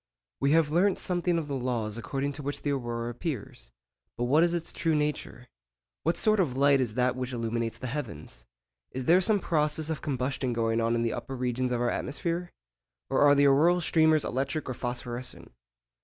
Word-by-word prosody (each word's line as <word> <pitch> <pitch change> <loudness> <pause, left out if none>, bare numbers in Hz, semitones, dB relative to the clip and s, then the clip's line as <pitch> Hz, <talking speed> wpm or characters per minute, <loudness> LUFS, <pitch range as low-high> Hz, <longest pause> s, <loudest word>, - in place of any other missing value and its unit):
We 140 +2 +2
have 160 -2 +3
learnt 185 +4 +3
something 175 -1 0
of 160 -3 -2
the 140 - -3
laws 120 -5 -2
according 135 +4 -3
to 145 +1 -6
which 145 +1 -4
the 145 - 0
aurora 120 -3 -3
appears; 115 - -6 0.5
but 120 - -1
what 140 +6 +4
is 170 - +3
its 170 -1 -3
true 165 -2 0
nature? 150 -4 -2 0.5
What 165 - 0
sort 215 -1 +3
of 135 -9 0
light 140 -1 +4
is 115 -4 -2
that 125 0 +1
which 130 0 -4
illuminates 115 -1 -2
the - - -7
heavens? 75 - -6 0.4
Is 130 -1 -5
there 175 +6 +5
some 205 +2 +3
process 155 -2 0
of 155 - -4
combustion 130 -2 -2
going 115 0 0
on 115 +1 +1
in 115 - 0
the 115 - 0
upper 135 - -5
regions 125 0 -1
of 120 -1 0
our 120 - +1
atmosphere? 170 +4 -3 0.6
Or 135 - +2
are 145 0 +7
the 145 0 +4
auroral 155 +6 +5
streamers 160 -2 +3
electric 140 +4 -2
or 130 - -2
phosphorescent? 120 +1 -5
135 Hz, 195 wpm, -28 LUFS, 120-155 Hz, 0.6 s, are